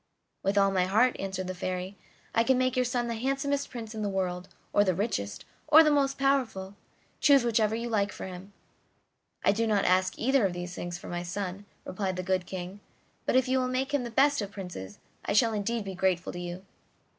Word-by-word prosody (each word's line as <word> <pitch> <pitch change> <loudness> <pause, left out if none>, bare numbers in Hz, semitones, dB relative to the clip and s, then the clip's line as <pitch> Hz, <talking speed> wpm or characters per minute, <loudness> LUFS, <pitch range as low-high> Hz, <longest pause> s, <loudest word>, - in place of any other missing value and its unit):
"With 195 +1 0
all 195 0 +5
my 185 -1 +2
heart," 220 +7 +3
answered 190 -1 -3
the 185 - -3
Fairy. 185 +1 -4 0.4
"I 230 - +4
can 260 +2 +3
make 255 0 +1
your 255 - +3
son 245 -1 -1
the 235 - -2
handsomest 275 +4 -1
prince 230 -3 -7
in 220 - -5
the 205 - -1
world, 185 -2 -2 0.2
or 205 - +5
the 185 -3 +1
richest, 170 - -2 0.2
or 315 +2 +9
the 305 - +3
most 275 -1 +2
powerful; 250 -9 0 0.4
choose 280 -3 +6
whichever 220 -2 +2
you 235 +1 -3
like 210 -3 +1
for - - -7
him." 185 +1 -9 0.9
"I - - +6
do 225 +3 0
not 210 -2 +2
ask 185 +1 +2
either 265 0 +2
of 190 -3 +1
these 175 0 -5
things 175 0 -5
for - - -11
my 175 0 -3
son," 185 +2 -5 0.2
replied 190 0 -2
the 185 - -3
good 185 -1 0
King; 185 +1 -6 0.5
"but - - +2
if 260 -1 +4
you 260 +1 +2
will 255 - 0
make 260 +2 -2
him 285 -3 +1
the 240 - -4
best 280 +3 +3
of 200 - -4
princes, 180 - -8 0.3
I - - -1
shall 225 +1 +4
indeed 215 +1 -2
be 195 - -5
grateful 185 -1 0
to 175 - -6
you. 175 +2 -6
205 Hz, 220 wpm, -29 LUFS, 185-245 Hz, 0.9 s, or